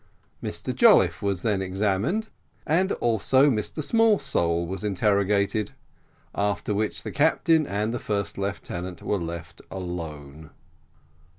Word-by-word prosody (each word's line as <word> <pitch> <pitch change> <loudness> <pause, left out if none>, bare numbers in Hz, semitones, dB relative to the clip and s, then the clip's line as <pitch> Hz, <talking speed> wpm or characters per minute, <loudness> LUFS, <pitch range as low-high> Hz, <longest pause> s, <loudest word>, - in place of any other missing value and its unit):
Mr - - -4
Jolliffe - - +5
was 100 -3 -1
then 105 -4 +1
examined, 100 - -1 0.4
and 185 +5 +2
also 125 +5 +3
Mr 115 +7 -2
Smallsole 140 - +2
was 95 +4 -5
interrogated: 100 +1 +1 0.6
after 105 +1 -1
which 105 +1 -2
the - - -5
captain 160 0 +3
and 105 +3 -1
the 120 - -2
first 100 -5 -2
lieutenant 95 -3 -5
were 100 - 0
left 85 -1 -7
alone. 80 -5 -7
100 Hz, 115 wpm, -25 LUFS, 90-120 Hz, 0.6 s, Jolliffe